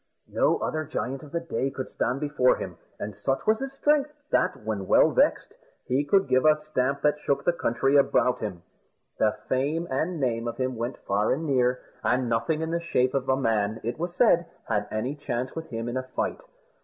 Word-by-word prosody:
No - - +3
other 155 0 -2
giant 135 -3 -4
of 145 - -12
the 170 - -1
day 135 -5 -2
could 135 -1 -5
stand 130 +3 -2
before 145 -4 +3
him; - - -6 0.2
and 100 -1 -5
such 135 +7 -1
was 220 +1 +3
his 270 0 -5
strength, 295 +1 +2 0.2
that, 140 -10 +1
when 105 -3 -3
well - - +5
vexed, - - +2 0.3
he 130 +3 +1
could 195 +6 +3
give 130 0 +3
a 155 0 +5
stamp 140 -3 -1
that 150 0 +3
shook 140 -1 0
the 175 - +3
country 135 -1 +2
about 125 -2 +3
him. 95 -6 -5 0.6
The - - +2
fame 150 +6 0
and 160 +6 -1
name 120 -3 0
of 115 0 -4
him 130 -1 -1
went 120 +3 -3
far 100 +2 +1
and 160 +4 -1
near; 125 -3 +2 0.2
and 125 0 +1
nothing 115 +8 0
in 160 - -3
the 170 - 0
shape 130 -6 +1
of 135 -1 -1
a 130 - +3
man, 110 -4 0
it 120 +6 -3
was 175 +1 -3
said, 175 -6 +4 0.2
had 105 -2 -1
any 110 +6 -2
chance 130 -3 -4
with 165 0 -5
him 115 -1 -4
in 120 +2 -2
a - - 0
fight. - - -1
135 Hz, 210 wpm, -26 LUFS, 120-155 Hz, 0.6 s, well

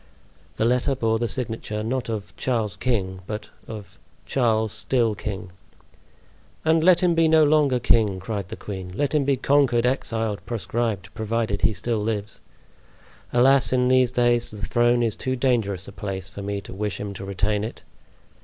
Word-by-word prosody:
The 110 - 0
letter 125 +3 +2
bore 115 -3 +1
the 120 - 0
signature, 110 -2 -3
not 125 +2 -2
of 110 -3 -5
"Charles, 115 -6 -1
King," 95 -7 -1
but 105 0 -6 0.2
of 100 -4 -9 0.3
"Charles—still 110 -1 +1
king." 100 -3 -6 1.1
"And 160 0 +4
let 180 0 +6
him 180 -2 +3
be 165 -1 +4
no 160 0 +6
longer 145 -4 +3
king," 110 -5 +2
cried 100 -1 -4
the - - -5
queen. 95 -3 -7
"Let 145 0 0
him 150 -3 +2
be 140 -1 +2
conquered, 130 -3 +3
exiled, 115 -6 -1
proscribed, 110 -4 -2
provided 110 -2 -1
he - - +3
still 115 +1 -2
lives. 105 -1 -3 0.9
Alas! 130 +2 +4
in 125 -1 +2
these 130 -1 +4
days 120 -1 +2
the 105 0 -5
throne 120 +1 +3
is 115 -3 0
too 130 0 -2
dangerous 115 -7 0
a - - -8
place 95 -2 -5
for 100 +1 -8
me 100 0 -3
to - - -10
wish 100 -1 -3
him 100 -1 -4
to 100 - -8
retain 100 +2 0
it. 110 - -6
115 Hz, 170 wpm, -24 LUFS, 105-125 Hz, 1.1 s, let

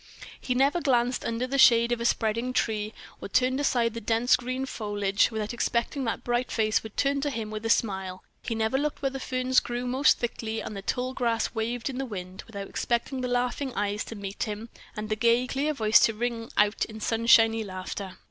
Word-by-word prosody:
He 250 - -2
never 280 +6 +2
glanced 250 -3 +1
under 230 +2 -1
the 275 +2 -2
shade 235 -2 +6
of 240 -1 0
a - - -2
spreading 230 +2 0
tree, 215 -3 0 0.3
or - - -6
turned 255 +5 +2
aside 240 -5 +1
the 230 - -6
dense 230 +3 +3
green 255 +1 -3
foliage, 205 -5 0
without 220 -1 -3
expecting 240 +3 -1
that 230 - +1
the - - -11
bright 240 +1 0
face 215 -1 +1
would 220 -2 -11
turn 280 0 +1
to 290 - 0
him 225 -5 -4
with 215 0 -5
a - - -3
smile; 190 -5 0 0.2
he 230 - -3
never 220 +4 +1
looked 295 -1 -3
where 270 - +1
the 270 - -5
ferns 255 0 +2
grew 240 +1 -4
most 260 +4 +3
thickly, 225 -2 -3
and 215 - -6
the 195 - -5
tall 250 +5 -2
grass 235 -3 0
waved 230 +1 -2
in 265 -1 -4
the 270 - -1
wind, 185 -3 -7
without 200 -3 -7
expecting 245 +2 -2
the 250 - -1
laughing 245 +2 -1
eyes 205 +1 -1
to 225 - -8
meet 200 -1 -7
him, 215 +1 -6 0.3
and 215 0 -4
the 215 - +1
gay, 235 +2 +3
clear 275 +4 -1
voice 220 -6 +4
to 225 - +3
ring 235 0 -3
out 210 0 +3
in 220 0 -10
sunshiny 225 0 +4
laughter. 185 0 -6
230 Hz, 215 wpm, -27 LUFS, 215-255 Hz, 0.3 s, shade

